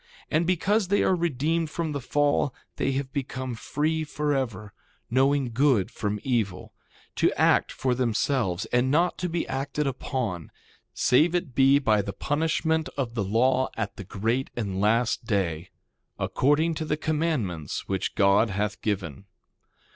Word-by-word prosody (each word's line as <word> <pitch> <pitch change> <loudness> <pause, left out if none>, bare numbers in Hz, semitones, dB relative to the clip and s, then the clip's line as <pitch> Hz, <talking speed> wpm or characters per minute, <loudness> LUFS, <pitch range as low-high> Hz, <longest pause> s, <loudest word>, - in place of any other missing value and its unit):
And 165 +2 +2
because 195 +3 +2
that 200 - +2
they - - +3
are 185 - +3
redeemed 165 0 0
from 165 -1 -3
the 145 -2 -3
fall 145 0 +1 0.2
they 135 - 0
have 135 0 -3
become 130 -2 -3
free 155 +7 -1
forever, 135 -9 -2 0.4
knowing 135 0 +2
good 125 -4 +2
from 105 -1 -3
evil; 110 -8 -1 0.4
to - - +3
act - - +3
for 130 -1 0
themselves 115 -5 0
and 125 +1 +3
not 170 +6 +2
to 180 - -2
be 170 0 -2
acted 140 +2 -2
upon, 125 - -3 0.5
save 160 +8 +3
it 175 -7 -2
be 135 +2 +5
by 110 -7 +2
the 100 0 -5
punishment 160 +5 0
of 125 -4 -2
the 115 -4 -1
law 125 +6 +2
at 110 -3 -3
the - - -7
great 115 +8 -1
and 100 -5 -2
last 115 +3 +1
day, 90 -6 -1 0.5
according 150 +5 +2
to 155 0 -4
the 150 0 -1
commandments 150 - -2
which 95 -1 -2
God 100 +3 +4
hath 105 +2 -2
given. 95 -6 -3
130 Hz, 155 wpm, -26 LUFS, 105-150 Hz, 0.5 s, be